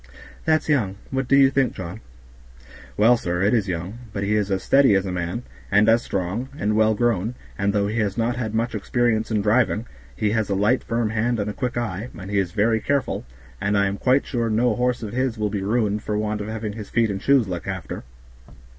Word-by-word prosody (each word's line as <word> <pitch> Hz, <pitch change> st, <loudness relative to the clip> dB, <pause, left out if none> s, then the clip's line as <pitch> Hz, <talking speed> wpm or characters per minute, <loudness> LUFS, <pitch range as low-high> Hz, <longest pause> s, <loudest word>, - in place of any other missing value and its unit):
"That's 155 Hz, -1 st, +2 dB
young; 115 Hz, -11 st, +1 dB, 0.2 s
what 135 Hz, -1 st, -1 dB
do 140 Hz, -, +4 dB
you 135 Hz, -1 st, +6 dB
think, 135 Hz, -2 st, +1 dB
John?" 95 Hz, +4 st, -7 dB, 1.0 s
"Well, 115 Hz, +4 st, +5 dB
sir, 90 Hz, -3 st, -2 dB
it 100 Hz, -, +3 dB
is 110 Hz, -4 st, +2 dB
young; 90 Hz, +6 st, -4 dB
but 100 Hz, -1 st, -3 dB
he 100 Hz, +2 st, 0 dB
is 105 Hz, -2 st, 0 dB
as 95 Hz, -1 st, -1 dB
steady 135 Hz, -7 st, +5 dB
as 95 Hz, 0 st, +1 dB
a 95 Hz, -, -3 dB
man, 90 Hz, +6 st, -3 dB, 0.3 s
and 105 Hz, +1 st, +4 dB
is 115 Hz, +1 st, +5 dB
strong, 100 Hz, +8 st, -3 dB
and 105 Hz, +1 st, 0 dB
well 110 Hz, 0 st, +3 dB
grown, 115 Hz, 0 st, 0 dB, 0.2 s
and 100 Hz, -1 st, 0 dB
though 100 Hz, 0 st, +1 dB
he 110 Hz, +3 st, -1 dB
has 105 Hz, -1 st, -1 dB
not 120 Hz, +1 st, +1 dB
had 110 Hz, -3 st, -3 dB
much 115 Hz, +2 st, 0 dB
experience 110 Hz, 0 st, 0 dB
in 105 Hz, -3 st, 0 dB
driving, 110 Hz, 0 st, +2 dB, 0.3 s
he 105 Hz, -1 st, 0 dB
has 110 Hz, -1 st, 0 dB
a 100 Hz, -, +1 dB
light 105 Hz, +6 st, +2 dB
firm 115 Hz, -2 st, -1 dB
hand 115 Hz, +1 st, 0 dB
and 105 Hz, +1 st, -1 dB
a -, -, -8 dB
quick 125 Hz, 0 st, -3 dB
eye, 110 Hz, -1 st, -3 dB
and 95 Hz, +1 st, -7 dB
he 100 Hz, -, +2 dB
is 95 Hz, -3 st, -1 dB
very 110 Hz, +2 st, +2 dB
careful, 140 Hz, +3 st, -1 dB, 0.4 s
and 105 Hz, +1 st, +1 dB
I 100 Hz, -, +3 dB
am 100 Hz, 0 st, -1 dB
quite 130 Hz, +2 st, +3 dB
sure 120 Hz, -3 st, -1 dB
no 110 Hz, +1 st, +2 dB
horse 125 Hz, -1 st, 0 dB
of 105 Hz, -, -5 dB
his 125 Hz, -2 st, 0 dB
will 105 Hz, -1 st, -1 dB
be 100 Hz, -2 st, -2 dB
ruined 105 Hz, 0 st, 0 dB
for 105 Hz, -1 st, -2 dB
want 105 Hz, 0 st, -1 dB
of 105 Hz, -, -5 dB
having 110 Hz, -1 st, -4 dB
his 105 Hz, -1 st, -8 dB
feet 115 Hz, -2 st, +2 dB
and 95 Hz, 0 st, -4 dB
shoes 135 Hz, -6 st, +3 dB
looked 90 Hz, -2 st, -5 dB
after." -, -, -5 dB
110 Hz, 235 wpm, -23 LUFS, 100-120 Hz, 1.0 s, you